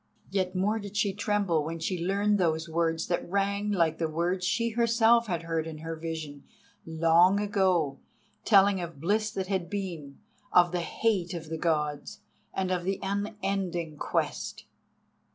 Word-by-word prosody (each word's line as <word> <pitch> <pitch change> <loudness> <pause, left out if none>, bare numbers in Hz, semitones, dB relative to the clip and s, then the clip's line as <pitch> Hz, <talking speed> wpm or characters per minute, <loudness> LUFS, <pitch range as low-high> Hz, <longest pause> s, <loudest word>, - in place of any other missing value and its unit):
Yet 185 -1 -1
more 205 +4 +1
did 205 0 -7
she 205 -2 +1
tremble 205 -6 0
when 165 +2 -4
she 170 +1 -2
learned 200 +2 +1
those 160 -2 +1
words 165 0 0
that 175 0 -2
rang 200 +2 0
like 165 -5 +1
the 165 -1 0
words 175 +4 -1
she 230 +4 +1
herself 235 0 +3
had 170 -4 -2
heard 165 -1 -2
in 160 -1 -7
her 165 +1 -5
vision 160 -3 -6 0.4
long 165 +4 +4
ago—telling 195 +1 +1
of 170 -4 -7
bliss 210 +7 +1
that 190 -2 -3
had 185 -3 -2
been, 170 -8 -5 0.3
of 175 -1 +5
the 180 -1 -1
hate 180 -1 0
of 165 -2 -7
the 160 - -3
Gods, 150 +4 -1 0.3
and 190 -1 -2
of 180 -1 0
the 190 +1 -1
unending 195 -5 -2
Quest. - - -2
180 Hz, 155 wpm, -28 LUFS, 165-200 Hz, 0.4 s, of